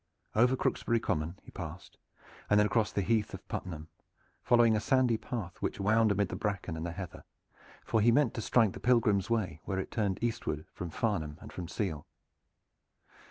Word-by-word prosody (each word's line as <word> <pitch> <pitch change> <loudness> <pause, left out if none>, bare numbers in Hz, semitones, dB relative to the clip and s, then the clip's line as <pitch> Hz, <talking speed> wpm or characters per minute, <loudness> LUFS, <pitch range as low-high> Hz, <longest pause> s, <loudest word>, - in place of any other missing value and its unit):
Over 125 +4 +5
Crooksbury 115 -2 +1
Common 80 -3 -2
he - - -13
passed, 85 0 -8 0.5
and 105 - +5
then 105 - +5
across 105 +1 +1
the 100 - 0
great - - -7
Heath 105 - -4
of - - -12
Puttenham, 80 -4 -5 0.5
following 120 -2 +5
a - - +2
sandy 125 +2 +3
path 110 -6 -5
which - - -2
wound 110 +2 +3
amid 100 -2 +1
the - - -4
bracken 100 -5 -2
and 80 - -5
the 85 - -2
heather, 90 -1 -7 0.6
for 110 - +2
he 120 +3 +5
meant 135 0 +3
to 115 - -3
strike 110 -1 +3
the - - -8
Pilgrims' 115 -5 +3
Way 95 -9 -1
where 95 - -2
it 95 - -3
turned 100 -4 0
eastward 110 -10 -2
from 90 - -5
Farnham 80 -6 -1
and - - -11
from 90 -2 -5
Seale. 85 -6 -3
105 Hz, 190 wpm, -31 LUFS, 90-115 Hz, 0.6 s, Over